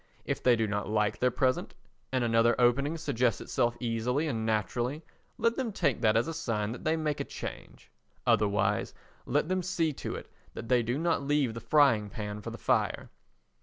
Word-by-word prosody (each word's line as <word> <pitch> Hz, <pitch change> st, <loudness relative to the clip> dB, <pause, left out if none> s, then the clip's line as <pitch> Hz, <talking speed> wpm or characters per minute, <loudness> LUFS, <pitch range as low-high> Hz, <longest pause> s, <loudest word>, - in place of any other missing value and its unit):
If -, -, -2 dB
they 125 Hz, -1 st, +5 dB
do 115 Hz, -1 st, +1 dB
not 105 Hz, -1 st, -2 dB
like 105 Hz, 0 st, +1 dB
their 125 Hz, -, +3 dB
present 130 Hz, +1 st, 0 dB, 0.4 s
and 130 Hz, -1 st, +1 dB
another 115 Hz, +1 st, +3 dB
opening 140 Hz, +6 st, +3 dB
suggests 125 Hz, -7 st, 0 dB
itself 120 Hz, 0 st, 0 dB
easily 120 Hz, +5 st, 0 dB
and 115 Hz, -6 st, -2 dB
naturally, 120 Hz, -, -1 dB, 0.3 s
let 230 Hz, +1 st, +2 dB
them 255 Hz, -4 st, -1 dB
take 140 Hz, -, 0 dB
that 110 Hz, -2 st, +4 dB
as 115 Hz, -, +1 dB
a 165 Hz, -, -3 dB
sign 110 Hz, -9 st, -2 dB
that 125 Hz, -, -7 dB
they 160 Hz, +1 st, +1 dB
make 155 Hz, -2 st, -1 dB
a -, -, 0 dB
change; -, -, -9 dB, 0.3 s
otherwise, 100 Hz, -2 st, +1 dB, 0.3 s
let 145 Hz, +4 st, +1 dB
them 185 Hz, +1 st, 0 dB
see 165 Hz, -3 st, 0 dB
to -, -, -5 dB
it -, -, -8 dB, 0.3 s
that 115 Hz, -, -7 dB
they 125 Hz, -1 st, +4 dB
do 120 Hz, +3 st, -1 dB
not 165 Hz, 0 st, +1 dB
leave 140 Hz, -4 st, +1 dB
the 115 Hz, -, -7 dB
frying 130 Hz, -9 st, +4 dB
pan 105 Hz, 0 st, -5 dB
for -, -, -6 dB
the -, -, -7 dB
fire. -, -, 0 dB
120 Hz, 195 wpm, -29 LUFS, 110-150 Hz, 0.4 s, they